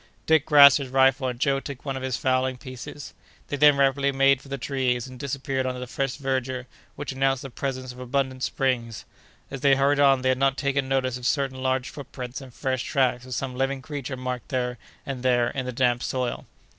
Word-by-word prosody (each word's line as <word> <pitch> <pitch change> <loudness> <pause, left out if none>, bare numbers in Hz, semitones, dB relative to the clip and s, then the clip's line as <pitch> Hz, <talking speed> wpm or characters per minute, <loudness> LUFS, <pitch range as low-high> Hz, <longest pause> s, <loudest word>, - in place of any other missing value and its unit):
Dick 160 -1 +3
grasped 140 -2 +8
his 135 -2 -5
rifle, 135 +1 +3
and 125 -1 -4
Joe 135 0 +2
took 140 -1 -8
one 135 -1 -2
of 130 - -5
the 130 0 -3
fowling 130 +1 0
pieces. 130 +2 -9 0.4
They - - -1
then 145 0 +6
rapidly 140 0 +2
made 135 0 +3
for - - -15
the 140 - -3
trees, 125 -2 -1
and 130 -1 -11
disappeared 135 -1 -2
under 125 0 -3
the 125 - -5
fresh 135 +1 -2
verdure, 130 -2 -2 0.3
which 145 - -5
announced 135 0 0
the 135 - -8
presence 130 -1 -4
of 125 - -13
abundant 130 +1 -2
springs. 120 -5 -1 0.5
As 135 - -6
they 140 -1 +5
hurried 140 +1 +2
on, 135 -2 +4
they 130 - +2
had 130 0 +1
not 135 0 +2
taken 140 -1 0
notice 130 -2 0
of 125 -1 -3
certain 135 -3 -1
large 130 -1 0
footprints 130 -2 -7
and 130 -2 -11
fresh 130 +1 -2
tracks 130 -2 0
of 130 - -4
some 130 0 -3
living 135 +1 -1
creature 140 -2 -5
marked 125 -1 -5
here 125 -1 -2 0.3
and 135 -3 -5
there 120 -2 +2
in 130 -2 -4
the - - -2
damp 120 -1 +1
soil. 125 -2 -3
130 Hz, 215 wpm, -25 LUFS, 125-135 Hz, 0.5 s, grasped